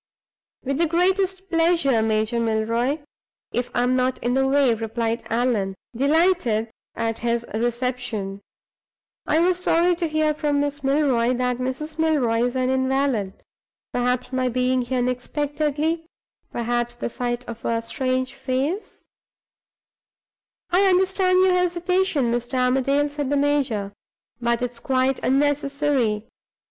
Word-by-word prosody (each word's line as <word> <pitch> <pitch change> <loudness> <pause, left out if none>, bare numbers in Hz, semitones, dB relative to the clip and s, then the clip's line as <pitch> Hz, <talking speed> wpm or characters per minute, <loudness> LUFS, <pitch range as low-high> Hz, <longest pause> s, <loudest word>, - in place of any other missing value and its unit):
"With 275 +2 -2
the 335 - +3
greatest 375 +3 +1
pleasure, 330 -8 +2
Major 220 +1 +1
Milroy, 230 +6 0 0.5
if 245 0 -2
I 245 - +2
am 250 +1 +2
not 255 0 +1
in 245 - +1
the 265 +1 +2
way," 270 -3 +4
replied 225 +1 -2
Allan, 225 -5 0 0.2
delighted 280 - +2 0.2
at 225 -1 -2
his 235 0 -1
reception. 235 -4 -2 0.9
"I 310 - +3
was 360 +1 +1
sorry 345 +2 +3
to 340 -1 -1
hear 310 0 +1
from 295 -1 0
Miss 290 0 -2
Milroy 265 -4 +2
that 250 0 -1
Mrs. 300 +5 -4
Milroy 280 -8 +2
is 245 +1 -2
an 255 0 +1
invalid. 260 -6 0 0.5
Perhaps 250 +1 -1
my 255 -1 +1
being 255 +1 +1
here 250 +1 -2
unexpectedly; 295 +5 -1 0.4
perhaps 240 0 -1
the 240 - -3
sight 240 +1 -3
of 230 -1 -8
a 230 0 0
strange 255 +2 -2
face 270 +8 -3 0.8
" - - -73
"I 385 +3 +4
understand 370 0 +3
your 375 -1 +4
hesitation, 360 -6 +1
Mr. 240 +2 -2
Armadale," 270 +3 +2
said 290 -2 -3
the 285 - +1
major; 265 -9 0 0.5
"but 235 0 0
it 245 - -1
is 235 - -11
quite 260 +1 +1
unnecessary. 280 -5 +1
260 Hz, 135 wpm, -23 LUFS, 240-300 Hz, 0.9 s, way